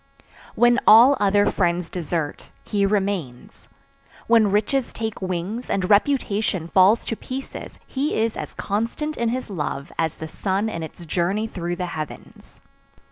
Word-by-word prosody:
"When 240 +1 +4
all 240 +6 +8
other 205 0 +3
friends 175 -2 0
desert, 165 -3 -3
he 200 -1 +1
remains, 195 -11 -3 0.6
when 225 -3 +4
riches 220 +6 0
take 220 -2 -4
wings 185 +6 -3
and 190 -2 0
reputation 205 - +1
falls 190 +5 +4
to 225 - -2
pieces 260 +4 -7
he 280 +3 -2
is 225 0 0
as - - -6
constant 230 +9 -2
in 235 -1 0
his 250 -2 -4
love 150 -3 -4
as 160 -2 0
the 160 - -6
sun 195 +6 -1
in 165 - -5
its 160 +2 -8
journey 180 +6 0
through 175 -5 -4
the 180 0 -3
heavens. 155 -3 -8
200 Hz, 145 wpm, -23 LUFS, 175-225 Hz, 0.6 s, all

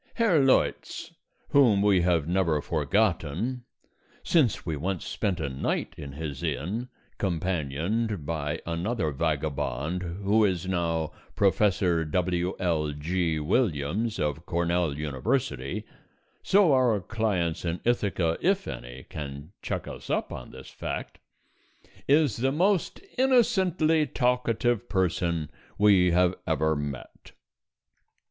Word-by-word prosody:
Herr 215 -9 +3
Leutz, 135 - +1 0.4
whom 115 -8 +5
we 100 -3 +4
have 85 -4 +2
never 85 -4 +2
forgotten 90 - 0 0.6
(since 135 - +2
we 80 -2 -2
once 90 +4 -3
spent 95 -4 -2
a 80 - -1
night 65 0 -2
in 70 -2 -8
his 70 -2 -5
inn, 85 - -3 0.3
companioned 90 +2 -1
by 75 -2 -2
another 85 +1 -1
vagabond 75 +1 -2
who 100 +5 +1
is 95 -4 +1
now 85 -4 -1 0.2
Prof. 100 -2 +2 0.5
W.L.G. 85 -2 0
Williams 100 - 0
of 75 +1 -2
Cornell 85 -3 0
University, 75 - -2 0.6
so 190 -6 +4
our 125 -5 +3
clients 95 -5 -1
in 85 0 -2
Ithaca, 100 -8 +1
if 195 +2 +1
any, 60 +1 -7
can 70 +1 -7
check - - -3
us - - -9
up - - -1
on - - -8
this 65 0 -11
fact), - - -5 0.9
is 145 -5 +3
the 130 +3 +1
most 180 +5 +1 0.2
innocently 190 - +3
talkative 120 -2 0
person 85 -4 0 0.3
we 100 -3 +5
have 90 +1 +3
ever 80 -1 +1
met. 75 -3 -7
90 Hz, 110 wpm, -27 LUFS, 75-115 Hz, 0.9 s, whom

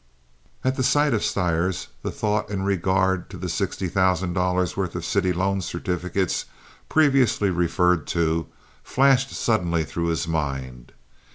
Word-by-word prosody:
At 130 +1 0
the 130 - +1
sight 145 +1 +3
of 110 - 0
Stires 90 -1 0
the - - -3
thought 105 -1 -1
in 100 -2 -2
regard 95 -1 +1
to 95 - -9
the 90 +1 -5
sixty 90 +2 -2
thousand 95 0 +1
dollars' 90 -1 0
worth 95 -3 -2
of 90 -1 -4
city 95 +1 +1
loan 95 +2 0
certificates, 90 +1 -2 0.4
previously 135 -10 +3
referred 90 -1 +1
to, 85 -1 0 0.4
flashed 135 0 +3
suddenly 85 -11 0
through 85 +3 -3
his 85 0 -1
mind. 70 -6 -4
90 Hz, 145 wpm, -24 LUFS, 85-100 Hz, 0.4 s, sight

